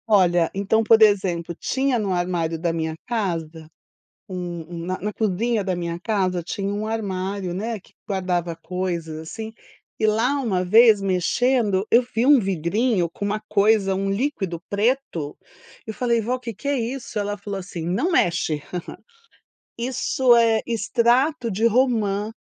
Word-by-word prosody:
Olha, 175 -5 +4
então, 200 +3 +1
por 225 0 +5
exemplo, 185 -5 +3
tinha 265 +6 0
no 200 -3 -1
armário 175 -2 -1
da 170 0 0
minha 160 -1 -2
casa, 165 -9 -3 0.6
um 175 -3 -5
um - - -6
na 185 +1 -2
na 210 - -3
cozinha 220 +2 0
da 185 -1 -1
minha 170 -1 -4
casa 185 -3 0
tinha 195 +4 -3
um 210 +1 -3
armário, 195 -3 -3
né, 215 +4 -3
que - - -24 0.2
guardava 180 -4 -1
coisas 170 -2 -4
assim, 220 +8 -7 0.5
e 220 - +2
lá 235 +7 +2
uma 190 -8 0
vez 220 +2 +6
mexendo 195 +2 +1
eu 235 - +7
vi 230 +2 +2
um 285 -1 +7
vidrinho 195 +1 0
com 200 - -6
uma 210 +1 -1
coisa 205 -1 +3
um 195 +1 -1
líquido 195 - -2
preto, 205 - -1 0.5
eu 220 - -5
falei 235 0 +1
vó 240 +4 -1
o - - -7
que 235 -2 -6
que 215 - -8
é 285 -2 +1
isso? 235 -1 -4
Ela 205 0 -2
falou 200 -1 -5
assim: 180 -3 -6
'Não 205 - 0
mexe"! 165 - +1 1.2
Isso 250 0 +2
é 225 -1 +4
extrato 240 +4 +1
de 215 +4 +1
romã, 220 -4 +1
200 Hz, 160 wpm, -23 LUFS, 180-230 Hz, 1.2 s, eu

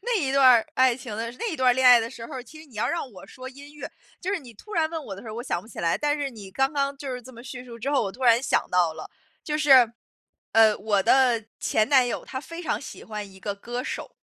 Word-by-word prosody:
那 480 -1 0
一 275 -6 -1
段 275 0 +3
儿 235 -3 +5
爱 255 -2 +4
情 245 -5 -8
的 230 +1 -3
那 420 - -4
一 - - -4
段 255 -1 +4
儿 - - +3
恋 260 0 +3
爱 245 -1 +9
的 225 - -3
时 230 -3 -9
候 290 - -9
儿， 255 - -5
其 310 +5 -14
实 315 - -14
你 240 -6 -17
要 235 +3 0
让 335 -6 -3
我 190 - -12
说 255 +4 -10
音 285 +2 -14
乐 300 - -8 0.3
就 375 +2 -2
是 400 - 0
你 245 -6 -14
突 425 - -14
然 320 -4 +1
问 325 -2 -4
我 195 - -6
的 195 - -10
时 225 - -10
候 215 - -6
儿 - - -8
我 240 - -4
想 175 -9 -2
不 220 - -17
起 - - -12
来， 165 -1 +1
但 295 0 0
是 280 -2 -2
你 205 -5 -11
刚 270 +8 0
刚 280 -1 -1
就 275 -2 -6
是 250 - -5
这 255 +2 -13
么 235 - -11
叙 255 -1 -8
述 235 -2 -11
之 270 +5 -3
后， 280 - +2
我 195 - -3
突 260 - -11
然 235 +1 +5
想 - - +1
到 175 -3 +2
了， - - -9 0.3
就 300 0 -2
是， 260 -6 +6 0.6
呃， 220 -1 +6
我 205 -2 +1
的 245 -3 +3
前 215 0 +1
男 260 -3 +5
友 - - -4
他 260 - -6
非 335 +3 -9
常 - - -2
喜 - - -10
欢 210 -2 -7
一 190 - -15
个 200 +1 -4
歌 240 +5 -6
手。 - - -5
250 Hz, 330 characters per minute, -25 LUFS, 225-280 Hz, 0.6 s, 爱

